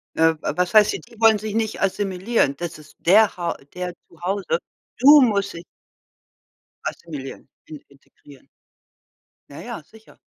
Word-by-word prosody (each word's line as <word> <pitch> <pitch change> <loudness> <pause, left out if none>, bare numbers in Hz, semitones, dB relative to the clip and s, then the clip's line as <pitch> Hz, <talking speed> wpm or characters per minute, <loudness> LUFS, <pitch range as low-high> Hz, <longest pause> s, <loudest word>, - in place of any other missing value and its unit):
Äh, 160 0 +4
was 180 +2 -1
heißt 215 0 +6
die - - -4
die 235 -1 -19
wollen 225 -1 +5
sich 210 0 -6
nicht 220 -1 -2
assimilieren? 195 - 0
Das 170 -1 -6
ist 155 0 -17
der 205 +5 +4
Hau 170 -1 -2 0.2
deren 180 -1 -5 0.2
zu 170 - -21
Hause. 200 - -1 0.4
Du 290 +3 +8
musst 200 -5 +1
dich 170 0 -9 1.2
assimilieren 145 -5 -7 0.2
in 150 -2 -11
integrieren. 140 0 -20 1.0
Ja, - - -10
ja, - - -7
sicher. 220 +7 -20
190 Hz, 145 wpm, -22 LUFS, 170-220 Hz, 1.2 s, Du